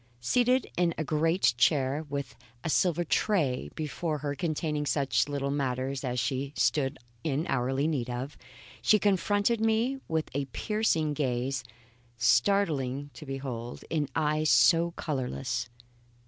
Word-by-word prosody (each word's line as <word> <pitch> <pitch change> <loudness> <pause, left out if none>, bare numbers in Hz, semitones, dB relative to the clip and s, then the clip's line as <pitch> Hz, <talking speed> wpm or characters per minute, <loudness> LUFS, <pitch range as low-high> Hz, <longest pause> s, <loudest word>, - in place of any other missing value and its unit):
Seated 250 - +2
in 170 -2 +2
a 155 - -1
great 160 +1 +2
chair, 140 +2 +2
with 140 -2 -4 0.3
a 160 - -1
silver 175 0 +2
tray 150 - +1
before 155 +1 -2
her 145 0 -3
containing 150 -2 -2
such 140 0 +1
little 140 -1 -1
matters 135 -1 -2
as 125 -1 -1
she 135 +2 -2
stood 135 +3 +1 0.3
in 150 +1 0
hourly 135 +2 0
need 135 -7 -1
of, 125 +4 -4 0.5
she 215 - +5
confronted 205 +3 +2
me 225 +4 +1
with 160 -1 -1
a 140 +1 -1
piercing 160 - 0
gaze 135 -1 -1 0.5
startling 135 - +2
to 130 +5 -11
behold 130 -3 -5
in 150 -3 0
eyes 155 0 +1
so 170 0 +5
colourless. 125 -4 -3
145 Hz, 135 wpm, -29 LUFS, 130-165 Hz, 0.5 s, she